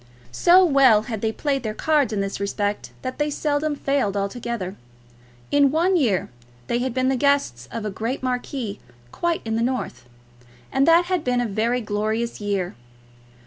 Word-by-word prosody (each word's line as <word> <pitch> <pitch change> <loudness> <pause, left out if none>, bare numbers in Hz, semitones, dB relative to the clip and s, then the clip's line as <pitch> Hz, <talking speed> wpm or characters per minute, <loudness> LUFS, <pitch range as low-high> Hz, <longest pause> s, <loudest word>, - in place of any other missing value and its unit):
So 355 - +6
well 265 -9 +5
had 220 -2 -5
they 220 - 0
played 275 +3 -1
their 215 -2 -4
cards 295 -5 +2
in 205 -2 -1
this 195 0 -3
respect, 205 +1 -2
that 255 +1 -5
they 295 0 +1
seldom 295 0 -1
failed 275 -9 0
altogether. 200 -1 -3 0.8
In 285 -1 +5
one 340 +6 +2
year 230 - +1 0.3
they 235 - 0
had 255 +1 -1
been 255 +2 0
the 265 - +2
guests 255 - +1
of 225 -2 -4
a 210 - -2
great 230 +7 -3
marquis 250 -4 -3 0.3
quite 340 -1 -1
in 220 0 -1
the - - 0
north, 230 - -3 0.6
and 270 +2 +2
that 335 +1 +6
had 360 -3 -1
been 250 -1 +1
a 245 - +1
very 230 +4 0
glorious 215 +2 -2
year. 200 -3 -1
245 Hz, 175 wpm, -23 LUFS, 210-280 Hz, 0.8 s, So